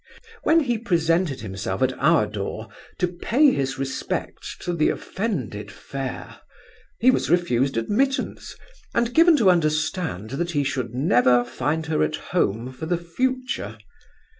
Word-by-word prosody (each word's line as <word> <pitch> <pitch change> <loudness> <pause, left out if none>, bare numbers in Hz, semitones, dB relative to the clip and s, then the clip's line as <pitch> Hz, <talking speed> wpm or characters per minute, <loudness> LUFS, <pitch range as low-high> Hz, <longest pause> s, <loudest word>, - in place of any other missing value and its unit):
When 325 +1 +4
he 240 -6 -1
presented 165 - +1
himself 95 0 -3
at 130 0 +2
our 155 -4 +4
door, 105 +1 -5 0.3
to 180 - +1
pay 245 - +3
his 135 - -1
respects 135 0 -4
to 175 - -2
the 155 -3 +2
offended 140 - -3
fair, 135 -2 -7 0.6
he 255 +3 +5
was - - -1
refused 135 -7 +2
admittance, 265 - -1 0.4
and 235 0 +1
given 330 -1 +6
to 205 -8 +5
understand 155 - -1
that 170 +6 -2
he 145 -1 +1
should 130 -4 -3
never 125 -3 +4
find 145 +6 -2
her 155 0 0
at 75 0 +1
home 115 +6 -1
for 145 +5 -6
the 175 +1 +1
future. 210 - -2
155 Hz, 140 wpm, -23 LUFS, 125-190 Hz, 0.6 s, given